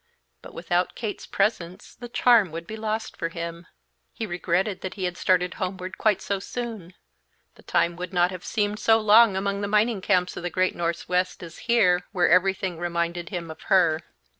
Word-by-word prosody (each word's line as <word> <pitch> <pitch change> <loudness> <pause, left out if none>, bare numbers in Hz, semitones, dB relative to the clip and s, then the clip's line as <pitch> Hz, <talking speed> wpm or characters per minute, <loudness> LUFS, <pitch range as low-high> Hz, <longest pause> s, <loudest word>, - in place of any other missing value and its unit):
But - - -13
without 175 +1 -1
Kate's 215 -3 -5
presence 195 -2 -2
the 240 +1 -10
charm 235 -7 +4
would 165 +1 -6
be 215 - -7
lost 220 0 -3
for 165 - -3
him. 170 0 -6 0.4
He 225 - -5
regretted 180 +1 -1
he 195 - -5
had 180 -1 -1
started 180 -1 +1
homeward 185 0 -4
quite 210 -3 +2
so 200 -1 -1
soon; 215 -5 -6 0.6
the - - -19
time 170 0 +1
would 180 0 -5
not 180 0 +2
have 180 -2 -8
seemed 210 0 -1
so 225 0 +4
long 215 -1 +6
among 200 +1 -1
the 200 - -1
mining 210 0 +2
camps 180 0 +1
of - - -6
the 175 - -3
great 185 +1 0
Northwest 180 +2 -1
as 170 -1 -10
here, 180 -7 +3
where 180 -3 +3
everything 185 -1 +2
reminded 170 0 -2
him 170 -4 -5
of 160 - -12
her. 170 -5 +4
185 Hz, 185 wpm, -25 LUFS, 175-210 Hz, 0.6 s, long